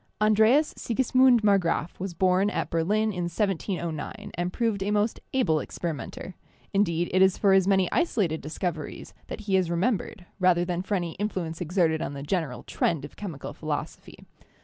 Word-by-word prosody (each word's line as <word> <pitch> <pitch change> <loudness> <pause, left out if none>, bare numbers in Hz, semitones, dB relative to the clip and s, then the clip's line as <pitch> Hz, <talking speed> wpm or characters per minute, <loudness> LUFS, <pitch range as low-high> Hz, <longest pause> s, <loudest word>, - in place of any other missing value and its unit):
An 215 0 +4
dreas 235 +9 +4
Sigismund 255 0 +3
Marggraf 185 -6 +1
was 185 -2 -4
born 185 +3 +3
at - - -3
Berlin 210 +6 +1
in 175 -1 -2
1709, 185 +1 -3
and 175 +1 -2
proved 225 -3 -1
a 195 - -1
most 210 +2 +1
able 235 -13 +2
experimenter; 170 +3 -5 0.4
indeed, 175 -4 +1
it 185 - +4
is 190 -1 +5
for 195 -2 +4
his 190 -1 +4
many 190 -2 +3
isolated 200 - 0
discoveries 155 +1 -5
that - - -6
he 200 -2 0
is 185 -3 +2
remembered 185 +1 -1
rather 180 -1 +3
than 175 0 -2
for 200 +2 -2
any 175 -3 -2
influence 180 -6 -3
exerted 165 -2 +1
on - - -3
the 140 0 -6
general 150 -6 -2
trend 155 -5 -1
of 145 - -12
chemical 145 -8 -6
philosophy. 155 -2 -6
185 Hz, 170 wpm, -26 LUFS, 165-210 Hz, 0.4 s, is